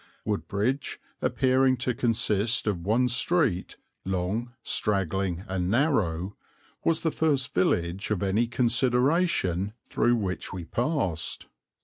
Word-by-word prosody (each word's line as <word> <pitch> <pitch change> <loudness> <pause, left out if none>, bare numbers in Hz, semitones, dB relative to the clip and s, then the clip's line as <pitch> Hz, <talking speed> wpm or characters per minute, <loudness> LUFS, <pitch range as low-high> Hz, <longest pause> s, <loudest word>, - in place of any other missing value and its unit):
Woodbridge, 105 +5 -1 0.2
appearing 130 0 +2
to 125 +1 -1
consist 115 -1 +1
of 95 -6 -1
one 115 +6 +2
street, 125 - 0 0.3
long, 95 +6 -2
straggling, 95 -3 0
and 90 -1 -1
narrow, 100 - +1 0.5
was 165 -1 +2
the 160 - 0
first 145 -5 +1
village 90 +1 0
of 105 -3 -1
any 105 +5 +1
consideration 120 - +1
through 120 0 +2
which 95 -5 -3
we 90 -3 -6
passed. 115 - -1
110 Hz, 110 wpm, -27 LUFS, 95-130 Hz, 0.5 s, appearing